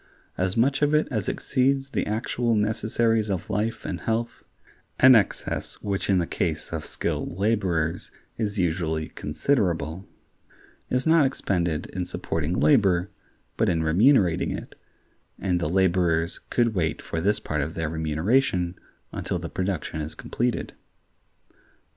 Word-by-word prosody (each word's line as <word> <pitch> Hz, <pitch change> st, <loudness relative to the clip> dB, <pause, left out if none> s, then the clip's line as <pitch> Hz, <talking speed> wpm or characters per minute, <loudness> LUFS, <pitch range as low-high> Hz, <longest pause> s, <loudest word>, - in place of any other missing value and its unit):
As 95 Hz, +2 st, -1 dB
much 135 Hz, +5 st, +2 dB
of 145 Hz, +1 st, +3 dB
it 150 Hz, -, +3 dB
as 110 Hz, -6 st, -1 dB
exceeds 135 Hz, +1 st, 0 dB
the -, -, -1 dB
actual 115 Hz, +2 st, 0 dB
necessaries 110 Hz, +1 st, +1 dB
of 95 Hz, -3 st, -3 dB
life 110 Hz, +3 st, -2 dB
and -, -, -4 dB
health 115 Hz, +1 st, -2 dB, 0.6 s
(an 130 Hz, 0 st, +9 dB
excess 105 Hz, -6 st, +1 dB
which 100 Hz, -1 st, -2 dB
in 95 Hz, -, +4 dB
the 85 Hz, -, +1 dB
case -, -, -2 dB
of -, -, -4 dB
skilled 85 Hz, -, -3 dB
laborers 95 Hz, -5 st, 0 dB, 0.3 s
is 105 Hz, -2 st, -2 dB
usually 80 Hz, -3 st, -1 dB
considerable) 85 Hz, -, -1 dB, 0.8 s
is 125 Hz, +1 st, 0 dB
not 160 Hz, -1 st, +5 dB
expended 85 Hz, -, -1 dB
in 90 Hz, -2 st, -3 dB
supporting 80 Hz, 0 st, -2 dB
labor, 100 Hz, -9 st, +3 dB, 0.5 s
but -, -, +2 dB
in 80 Hz, -2 st, +1 dB
remunerating 95 Hz, -, +4 dB
it, -, -, -6 dB, 0.6 s
and 90 Hz, -3 st, 0 dB
the 75 Hz, -, -1 dB
laborers 85 Hz, -2 st, +2 dB
could 120 Hz, -2 st, +2 dB
wait 80 Hz, -5 st, -1 dB
for 80 Hz, -, -4 dB
this 105 Hz, +4 st, +2 dB
part 75 Hz, -1 st, -2 dB
of 75 Hz, +3 st, -4 dB
their 80 Hz, -1 st, -1 dB
remuneration 85 Hz, -, +1 dB, 0.4 s
until -, -, -3 dB
the -, -, -5 dB
production 90 Hz, -4 st, -3 dB
is 75 Hz, +1 st, -5 dB
completed. 120 Hz, +7 st, -2 dB
95 Hz, 140 wpm, -25 LUFS, 85-115 Hz, 0.8 s, an